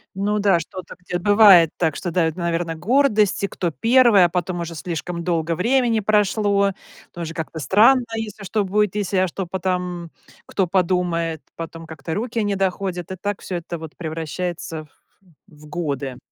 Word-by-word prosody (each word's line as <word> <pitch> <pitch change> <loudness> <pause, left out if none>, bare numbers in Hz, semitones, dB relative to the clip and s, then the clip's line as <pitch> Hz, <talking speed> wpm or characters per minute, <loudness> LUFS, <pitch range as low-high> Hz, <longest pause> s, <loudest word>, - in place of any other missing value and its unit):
Ну 205 +2 0
да, 200 -4 +3
что-то 180 +3 -8
где 180 0 -4
бывает 200 -4 +7
так, 160 -4 0
что 175 - -4
давит, 165 -2 +1
наверное, 170 -1 -1
гордость, 215 - +2
кто 175 -2 -2
1, 225 - +5
а - - +1
потом 175 0 -2
уже 170 0 -5
слишком 170 +1 -4
долго 165 -1 0
времени 235 +4 +2
прошло, 205 -1 +2 0.4
тоже 165 -1 -5
как-то 160 0 -5
странно, 220 - +5
если 215 -2 -5
что 205 +2 0
будет, 205 +1 0
если, 200 -2 -1
а 185 0 +3
что 185 +2 -4
потом 180 -1 -3 0.4
кто 195 - 0
подумает, 170 -3 0
потом 165 0 -7
как-то 160 0 -6
руки 230 +3 -2
не 205 -1 0
доходят, 190 -2 -2
и - - -3
так 205 +2 -4
всё 180 - -4
это 170 0 -6
вот 160 -1 -10
превращается 165 0 -5 0.6
в 150 -4 -16
годы. 140 -5 -3
180 Hz, 160 wpm, -21 LUFS, 165-205 Hz, 0.6 s, бывает